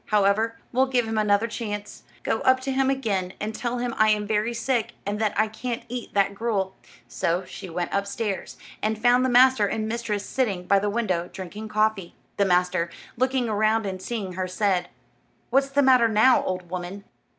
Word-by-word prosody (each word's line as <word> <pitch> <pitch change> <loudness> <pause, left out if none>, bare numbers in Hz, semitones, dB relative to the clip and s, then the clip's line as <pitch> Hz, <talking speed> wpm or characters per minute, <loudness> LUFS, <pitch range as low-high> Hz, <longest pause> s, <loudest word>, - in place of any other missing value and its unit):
However, 215 +2 +2
we'll 260 +2 +3
give 245 -3 +1
him 220 -1 -1
another 210 +1 +3
chance. 210 -3 -5 0.2
Go - - 0
up 260 0 +4
to 270 +1 -2
him 265 0 +2
again, 205 -9 -1
and 215 +1 -3
tell 240 +2 -3
him 245 -1 -2
I 215 0 +5
am 210 -1 +2
very 215 +2 0
sick, 235 -1 -1
and 205 +1 -2
that 210 -2 0
I 215 - +4
can't 235 +2 -5
eat 245 -3 -6
that 200 0 +3
gruel." 200 -3 -2 0.3
So 175 +3 -1
she 185 - -9
went 175 +1 -3
upstairs, 200 0 -3 0.2
and 215 +1 0
found 245 +3 +4
the 260 - +2
master 250 -3 +5
and 215 +1 -2
mistress 220 -3 -2
sitting 200 -9 -1
by 200 +2 +4
the 205 +1 -1
window, 190 -6 -1
drinking 195 +3 -7
coffee. 215 -4 0 0.2
The 200 - +3
master, 180 -2 +2 0.3
looking 255 0 +1
around 215 +1 +1
and 185 -1 -4
seeing 200 -4 -4
her, 185 0 -2
said: 185 -1 0 0.6
"What's 275 +1 +3
the 280 +1 +2
matter 255 -3 +6
now, 220 +4 +4
old 180 -2 -4
woman?" 185 +2 -5
215 Hz, 190 wpm, -25 LUFS, 195-235 Hz, 0.6 s, matter